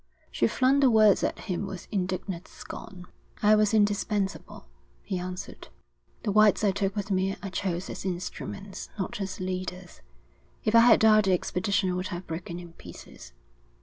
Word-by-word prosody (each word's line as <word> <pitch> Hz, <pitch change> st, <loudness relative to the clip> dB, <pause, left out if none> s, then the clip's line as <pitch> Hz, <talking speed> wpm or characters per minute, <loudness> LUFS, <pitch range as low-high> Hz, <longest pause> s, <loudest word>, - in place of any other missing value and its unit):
She 115 Hz, -, +2 dB
flung 265 Hz, -, +3 dB
the 275 Hz, -2 st, +5 dB
words 215 Hz, -3 st, +5 dB
at -, -, -1 dB
him 190 Hz, +2 st, -3 dB
with 185 Hz, -2 st, -8 dB
indignant 185 Hz, -2 st, -3 dB
scorn. 180 Hz, -1 st, -10 dB, 0.4 s
'I 210 Hz, +1 st, +6 dB
was 215 Hz, -1 st, +4 dB
indispensable,' 205 Hz, -, 0 dB, 0.4 s
he 185 Hz, -, -3 dB
answered. 180 Hz, +1 st, -7 dB, 0.6 s
'The 210 Hz, -, 0 dB
whites 215 Hz, +1 st, +5 dB
I 205 Hz, -, +4 dB
took 195 Hz, 0 st, -2 dB
with 205 Hz, -1 st, -3 dB
me 190 Hz, +1 st, +1 dB
I 195 Hz, -, -5 dB
chose 185 Hz, -1 st, -2 dB
as -, -, -7 dB
instruments, 190 Hz, +2 st, -5 dB
not 200 Hz, +1 st, -4 dB
as 195 Hz, -, -4 dB
leaders. 185 Hz, -1 st, -5 dB, 0.6 s
If 215 Hz, -, 0 dB
I 230 Hz, -, +8 dB
had 240 Hz, +1 st, +6 dB
died 215 Hz, -1 st, +6 dB
the 190 Hz, -, +3 dB
expedition 185 Hz, +1 st, 0 dB
would 180 Hz, +1 st, -2 dB
have 180 Hz, -1 st, -6 dB
broken 170 Hz, +1 st, -6 dB
in 175 Hz, -1 st, -10 dB
pieces. -, -, -13 dB
195 Hz, 165 wpm, -27 LUFS, 180-210 Hz, 0.6 s, I